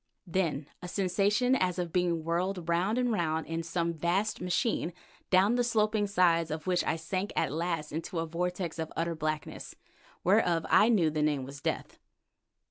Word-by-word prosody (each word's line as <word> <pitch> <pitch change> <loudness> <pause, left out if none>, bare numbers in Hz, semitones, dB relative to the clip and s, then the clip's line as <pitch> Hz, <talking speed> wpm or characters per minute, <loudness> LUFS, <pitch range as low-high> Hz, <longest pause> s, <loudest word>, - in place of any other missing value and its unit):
Then 165 -5 -1 0.2
a 180 - -6
sensation 205 +7 +2
as 185 -7 0
of 175 -2 -3
being 175 -3 +1
whirled 175 +2 -1
round 180 +7 +1
and 250 -1 +1
round 160 -6 0
in 165 0 -3
some 170 0 -1
vast 175 +7 0
machine, 180 -1 0 0.4
down 190 +4 +4
the 245 - +3
sloping 215 -3 +1
sides 170 -4 +3
of 155 0 -4
which 180 -1 +1
I - - +1
sank 185 +5 -3
at - - +1
last 165 -2 -2
into 165 +3 -4
a 165 - 0
vortex 175 +1 -3
of 160 -1 -3
utter 170 +1 0
blackness, 155 -1 -4 0.5
whereof 175 -4 +3
I 215 - +6
knew 175 -9 +3
the 155 0 -1
name 150 -3 +1
was 140 +2 -9
death. - - -3
175 Hz, 175 wpm, -30 LUFS, 165-195 Hz, 0.5 s, I